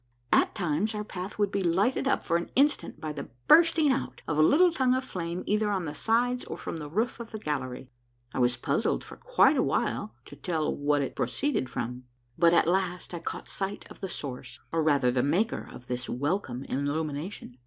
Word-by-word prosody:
At - - +4
times 190 +3 0
our 210 - -2
path 190 -1 -6
would 205 -1 +1
be 200 - 0
lighted 195 +10 +2
up - - +1
for 165 - +1
an 170 0 -1
instant 280 - +2
by 155 -2 -4
the 145 - -7 0.2
bursting 325 - +6
out 265 - -3
of 150 - 0
a 155 - +4
little 340 - +6
tongue 260 -5 +2
of 260 - -1
flame 175 -6 -4
either^ 210 0 +1
on 190 -4 -1
the 150 - -4
sides 245 +6 +1
or - - -6
from - - -5
the 150 -2 -6
roof 220 +9 -1
of 235 -1 -7
the 220 - -6
gallery. 130 -7 -4 0.4
I - - -2
was 125 0 +3
puzzled - - 0
for - - -10
quite - - +3
a - - +4
while 110 - -1
to - - -11
tell 155 +1 -1
what 145 0 +1
it 135 - -5
proceeded 130 - -1
from; 125 +1 -4 0.3
but 170 0 +5
at 170 - +4
last 180 0 0
I 170 - -3
caught - - -6
sight 195 +1 -4
of - - -12
the 190 - -3
source, 130 -4 -6
or 165 - +1
rather 140 -5 +3
the 125 0 +1
maker, 175 - 0
of 125 - -11
this 125 0 -4
welcome 135 -2 -2
illumination. 145 0 -3
170 Hz, 210 wpm, -28 LUFS, 140-210 Hz, 0.4 s, bursting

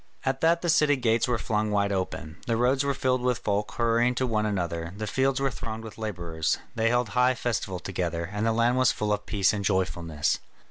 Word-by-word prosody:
At 135 0 0
that 170 +1 +3
the - - 0
city 150 -2 +4
gates 120 -2 +1
were 120 -1 +1
flung 105 0 -1
wide 100 -1 +1
open, 90 -4 -3
the 115 -1 +1
roads 130 +3 +2
were 140 -1 0
filled 130 -1 +1
with 125 -1 +1
folk 105 0 -2
hurrying 120 +1 +2
to 130 - +1
one 110 -3 0
another, 85 -3 -3
the 110 - -3
fields 130 +5 +1
were 135 0 +1
thronged 110 +1 -6
with 110 0 -10
labourers. 85 -7 -2 0.2
They 115 0 +1
held 120 -1 +1
high 125 +4 +3
festival 110 -6 -2
together, 85 -2 -3
and 105 +1 -2
the 115 - +2
land 115 +2 +2
was 130 -2 +4
full 105 -1 -1
of 105 0 -4
peace 100 -2 +2
and 100 -1 -2
joyfulness. 85 -5 0
110 Hz, 220 wpm, -27 LUFS, 100-125 Hz, 0.2 s, city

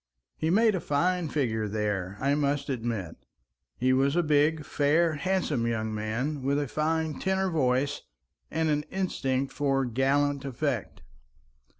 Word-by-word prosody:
He 160 - -1
made 220 +4 +4
a 185 - 0
fine 170 +3 0
figure 110 -8 0
there, 105 -2 -2
I 140 +1 +2
must 145 -1 0
admit; 115 - -3 0.6
he 130 +1 +2
was 135 +3 +2
a 175 - +3
big, 150 0 +2
fair, 155 +3 +2
handsome 155 -7 0
young 110 -1 -1
man 115 +8 -2
with 140 +2 +1
a 145 -1 -1
fine 160 +2 -1
tenor 190 0 0
voice 140 -2 +1 0.5
and 160 0 0
an 150 -1 +2
instinct 135 -8 -1
for 135 -1 +1
gallant 135 +3 +1
effect. 135 -4 -3
140 Hz, 140 wpm, -28 LUFS, 125-155 Hz, 0.6 s, made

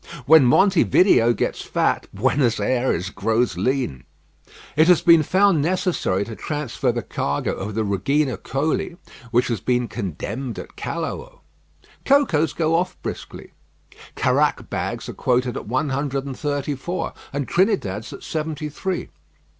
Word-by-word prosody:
When 155 -1 +7
Monte 190 +8 +4
Video 120 - +4
gets - - -2
fat, - - 0
Buenos 125 -6 +1
Ayres 105 -5 0
grows 110 +1 0
lean. 95 - -1 0.7
It 155 +2 +5
has 180 -2 +5
been 165 -2 +7
found 190 0 +3
necessary 165 - 0
to 110 - -7
transfer 140 -3 -2
the 120 -1 -3
cargo 70 +1 -2
of 105 +2 -5
the 110 - 0
Regina 125 +7 0
Coeli, 155 +5 -2 0.3
which 120 +1 +2
has 115 -4 -2
been 125 -1 0
condemned 115 - -5
at - - -9
Callao. - - -5 0.6
Cocoas 195 - +3
go 160 -1 0
off 180 +2 0
briskly. - - -7 0.6
Caraque - - +1
bags - - -3
are - - -6
quoted 125 -1 0
at - - -6
one 130 +6 0
hundred 135 0 -2
and 135 -2 -5
thirty 145 0 -2
four, 170 +6 -4 0.2
and 140 -1 -3
Trinidad's 170 - 0
at - - -10
seventy 155 -1 -3
three. 185 +5 -4
135 Hz, 145 wpm, -22 LUFS, 115-160 Hz, 0.7 s, When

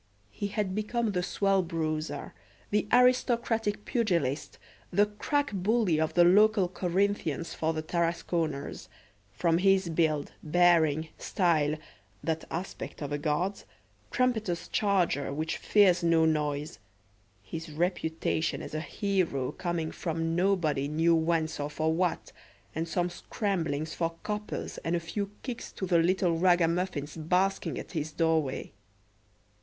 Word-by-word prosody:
He 205 - -3
had 205 -2 -2
become 215 +2 -1
the 180 -2 0
swell 195 +1 +1
bruiser, 160 -2 -3 0.4
the 210 0 +1
aristocratic 235 -4 +2
pugilist, 170 - 0 0.3
the 205 +3 +4
crack 280 +8 -1
bully 195 -4 +2
of 160 - -1
the 175 - +7
local 205 +2 +5
Corinthians 180 -3 -1
for 160 0 0
the 155 -1 -3
Tarasconers, 165 -3 -2 0.4
from 165 - +1
his 190 -1 +3
build, 155 -3 +1
bearing, 160 -2 +3
style 160 -6 +1 0.5
that 160 +1 -2
aspect 170 -2 -5
of 145 - -5
a 145 - -1
guard's 165 +6 -1 0.5
trumpeter's 220 -9 0
charger 180 -9 +1
which 155 +3 -2
fears 190 -4 +4
no 165 -1 +4
noise; 150 -1 -1 0.6
his 160 - -7
reputation 160 -1 -1
as - - -8
a 155 - -2
hero 175 -9 -1
coming 170 -3 -3
from 165 -1 -2
nobody 170 -7 +1
knew 165 +3 +3
whence 160 -1 +1
or 145 0 -2
for 155 +1 0
what, 175 +1 -1 0.4
and 165 +1 -2
some 175 +1 -1
scramblings 160 -6 -2
for 165 -1 -2
coppers 210 0 -4
and 165 +1 -1
a - - +1
few 195 +4 -4
kicks 250 -3 -5
to 190 - -4
the 175 -2 +3
little 175 -1 +2
ragamuffins 175 -4 +1
basking 180 +5 0
at - - -7
his 155 -3 -3
doorway. 160 -4 0
170 Hz, 130 wpm, -29 LUFS, 160-195 Hz, 0.6 s, the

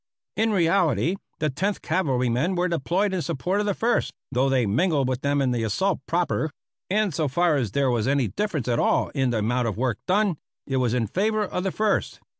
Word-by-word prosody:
In 220 0 +1
reality, 170 - +2 0.2
the 155 -2 -1
Tenth 195 +9 -2
Cavalrymen 135 -1 0
were 180 +1 +1
deployed 180 +5 0
in 185 - 0
support 180 +8 -1
of 210 - 0
the 200 - 0
First, 235 +2 +1 0.2
though 130 +1 +2
they 130 -3 +2
mingled 140 - +1
with 130 0 -2
them 140 0 +1
in 130 - +1
the 120 -2 -1
assault 175 - 0
proper; 170 -2 0 0.4
and 205 -2 +1
so 155 0 0
far 170 +3 +2
as 120 -8 -1
there 140 -2 +2
was 120 -1 0
any 135 -3 +2
difference 190 - -2
at 120 -1 +1
all - - +2
in 135 -3 0
the 120 - 0
amount 120 +3 0
of 105 -3 -3
work 125 -2 -1
done, 195 -2 +2 0.3
it 135 - -1
was 125 -2 +1
in 120 -2 +1
favor 210 - 0
of 180 -2 -3
the 190 - -1
First. 215 +1 0
150 Hz, 215 wpm, -24 LUFS, 125-190 Hz, 0.4 s, reality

